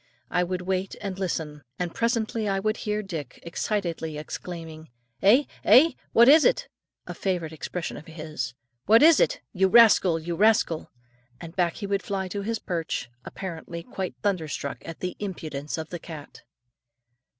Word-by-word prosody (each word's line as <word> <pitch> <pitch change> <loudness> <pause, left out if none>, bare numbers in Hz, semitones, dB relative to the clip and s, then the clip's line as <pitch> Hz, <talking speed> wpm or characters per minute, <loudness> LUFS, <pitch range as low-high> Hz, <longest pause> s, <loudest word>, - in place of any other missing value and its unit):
I 180 - +2
would 180 0 -3
wait 190 +1 -2
and 195 -2 -5
listen; 160 -5 -3 0.2
and 175 -2 -3
presently 230 -2 0
I 195 - +1
would 215 +2 0
hear 210 -1 -2
Dick 160 -9 -6
excitedly 170 -3 -2
exclaiming, 160 0 -7 0.3
"Eh? 230 +9 +6 0.2
eh? 260 +11 +7 0.2
What 235 +1 +6
is 300 +3 +8
it?" - - +2 0.4
a - - -6
favourite 175 -5 -2
expression 165 +2 -5
of 150 - -11
his: 155 -6 -5 0.3
"What 225 +6 +7
is 325 0 +7
it? - - +2
You 190 -1 +3
rascal! 195 -5 +6
you 170 +1 -4
rascal!" 210 -5 +2 0.5
and 165 +2 -9
back 175 -2 +1
he 205 - -5
would 200 0 0
fly 195 -2 -3
to 200 +2 -3
his 225 +3 -2
perch, 165 - -3
apparently 170 -2 -6
quite 185 +1 -5
thunderstruck 160 -8 -2
at 165 - -8
the 180 0 -3
impudence 155 -8 -5
of 160 0 -5
the 175 - -5
cat. 155 -5 -10
180 Hz, 160 wpm, -26 LUFS, 160-210 Hz, 0.5 s, is